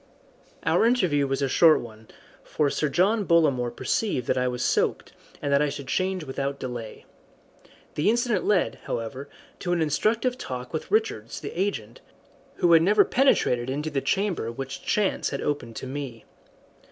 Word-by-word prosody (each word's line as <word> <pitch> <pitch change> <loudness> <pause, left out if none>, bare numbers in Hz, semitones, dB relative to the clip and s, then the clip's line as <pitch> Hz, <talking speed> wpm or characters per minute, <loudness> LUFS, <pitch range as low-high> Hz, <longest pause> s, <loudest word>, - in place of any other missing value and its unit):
Our 225 - +3
interview 175 - +2
was 135 +1 -1
a - - +2
short 155 +4 +5
one, 110 -2 -11 0.4
for 145 -2 0
Sir 150 - 0
John 200 +8 +2
Bollamore 150 -9 +3
perceived 195 - -1
that - - +1
I 125 0 +1
was 125 -1 -2
soaked, - - 0 0.3
and 140 - 0
that 140 - +4
I 150 - +2
should 140 -1 -6
change 185 +2 -1
without 140 0 -3
delay. 120 -4 -7 0.9
The 150 +7 +1
incident 235 -3 +1
led, 205 -4 +1
however, 130 +5 -5 0.3
to 175 - -1
an 175 - 0
instructive 220 - +1
talk 125 +1 -6
with 155 - -4
Richards, 190 - -1
the - - -6
agent, 165 - -3 0.5
who 175 - +2
had 165 - +7
never 205 +5 +5
penetrated 130 - +2
into 150 +4 -3
the 140 -2 -1
chamber 180 - -1
which 135 +2 -6
chance 210 -3 0
had 140 - -4
opened 145 -6 -3
to - - -6
me. 130 -3 -6
145 Hz, 165 wpm, -25 LUFS, 130-190 Hz, 0.9 s, had